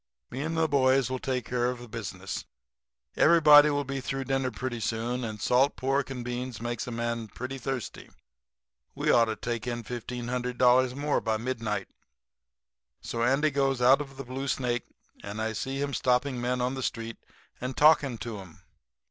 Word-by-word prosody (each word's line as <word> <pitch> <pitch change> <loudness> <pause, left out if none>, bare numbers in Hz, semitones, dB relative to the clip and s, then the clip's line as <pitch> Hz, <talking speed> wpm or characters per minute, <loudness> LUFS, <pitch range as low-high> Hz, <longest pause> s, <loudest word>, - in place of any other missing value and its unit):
Me 130 - -4
and 160 +2 -2
the 160 0 +3
boys 130 -3 +3
will 130 - -2
take 125 -3 -2
care 120 0 0
of 125 - -3
the 120 0 -10
business. 95 -4 -6 0.7
Everybody 150 -2 +7
will 145 -1 0
be 135 0 -4
through 135 +1 -3
dinner 135 -1 0
pretty 125 -2 -4
soon, 115 +3 -2
and 110 -2 -5
salt 130 +6 +3
pork 135 +1 0
and 125 -3 -5
beans 125 -1 -4
makes 120 0 -3
a - - -4
man 115 -1 -2
pretty 130 +5 -6
thirsty. 130 -2 -5 0.9
We - - +1
ought 115 - +5
to 110 -1 -3
take 120 0 -4
in 120 -1 -3
$1,500 125 +1 +1
more 145 +1 0
by 110 -1 0
midnight.' 115 -3 -3 1.1
"So 115 - -4
Andy 135 +6 +3
goes 135 -2 +1
out 130 +4 +5
of 135 -2 -9
the 135 - -6
Blue 130 +2 -4
Snake, 125 -3 -1 0.4
and 100 +2 -6
I 110 0 -1
see 135 +5 -3
him 140 0 -2
stopping 125 0 +1
men 125 +1 0
on 125 +1 0
the 135 - -4
street 115 -2 -3 0.4
and 125 +1 -4
talking 150 -5 +5
to 110 -1 -6
'em. 90 -4 -13
125 Hz, 180 wpm, -28 LUFS, 120-135 Hz, 1.1 s, Everybody